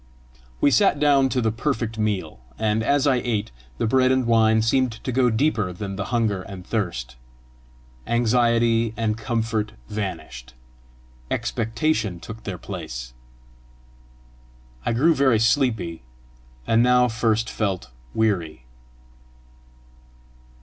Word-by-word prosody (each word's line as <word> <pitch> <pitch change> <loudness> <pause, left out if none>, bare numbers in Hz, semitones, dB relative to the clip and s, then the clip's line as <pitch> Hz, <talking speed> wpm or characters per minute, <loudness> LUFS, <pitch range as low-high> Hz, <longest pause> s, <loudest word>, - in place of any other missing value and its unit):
We 145 - +4
sat 195 -6 +3
down 140 -2 +4
to 125 -1 0
the 110 -1 +1
perfect 115 -2 -2
meal; 105 -3 -2 0.2
and 110 0 +1
as 140 +4 +2
I 135 -3 +3
ate, 110 -4 -2 0.3
the - - 0
bread 130 +3 +3
and 130 -1 +2
wine 110 -1 +4
seemed 125 +1 +2
to 120 +3 -5
go 125 0 +3
deeper 110 -5 +1
than 95 +2 -6
the 95 0 -3
hunger 110 -5 0
and 95 -1 -9
thirst. 70 - -3 0.9
Anxiety 115 -1 +2
and 110 -1 0
discomfort 115 -2 -2 0.2
vanished; 90 - -6 0.7
expectation 115 - -1
took 110 +4 -10
their 95 -3 -4
place. 70 -10 -7 1.7
I - - +2
grew 155 +8 +4
very 135 -5 +3
sleepy, 110 - +1 0.6
and 115 0 +3
now 125 0 +4
first 115 -1 0
felt 95 - -3 0.2
weary. 90 - 0
115 Hz, 120 wpm, -23 LUFS, 100-125 Hz, 1.7 s, We